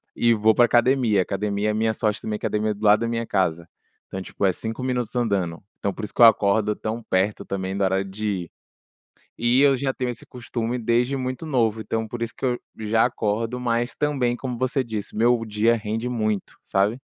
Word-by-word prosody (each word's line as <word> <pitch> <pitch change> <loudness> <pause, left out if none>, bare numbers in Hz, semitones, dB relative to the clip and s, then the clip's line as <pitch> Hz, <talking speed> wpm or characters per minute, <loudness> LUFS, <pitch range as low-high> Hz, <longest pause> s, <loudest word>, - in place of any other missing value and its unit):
e 120 0 +3
vou 110 0 +3
pra 120 - +5
academia. 120 -4 +3
Academia 100 +2 -1
é - - -2
minha 110 +1 +1
sorte 105 -1 -1
também 105 -1 -3
academia 105 +1 -1
é - - -1
do 105 +1 -6
lado 105 +2 +6
da 115 - 0
minha 115 0 -2
casa, 85 -2 0 0.4
então, 95 - -5
tipo, 100 - -3
é 95 - +4
5 115 +5 -5
minutos 125 -2 -2
andando, 100 -8 0 0.2
então 100 - -2
por 110 - -5
isso 105 - -10
que - - -1
eu - - +11
acordo 105 -1 +4
tão 110 +2 -5
perto 95 +3 0
também 95 0 -4
do 100 - +1
horário 95 0 +1
de 105 +2 -3
ir. - - -14 0.8
E 120 +3 +3
eu 140 -1 +5
já 135 +1 -1
tenho 125 -1 -3
esse 120 - -10
costume 120 0 -4
desde 120 +3 +1
muito 130 +3 -4
novo, 115 -6 +1
então 110 +1 -2
por 120 +1 -7
isso 115 - -3
que - - -4
eu 125 -1 0 0.2
já 110 +1 +2
acordo, 115 +3 -1
mas, 120 0 -1
também, 135 -5 0
como 125 -3 -5
você 130 +1 0
disse, 110 -4 -5
meu 120 +1 +3
dia 110 +2 +2
rende 115 +2 -3
muito, 110 -4 -2
sabe? 100 +6 0
115 Hz, 215 wpm, -23 LUFS, 105-120 Hz, 0.8 s, eu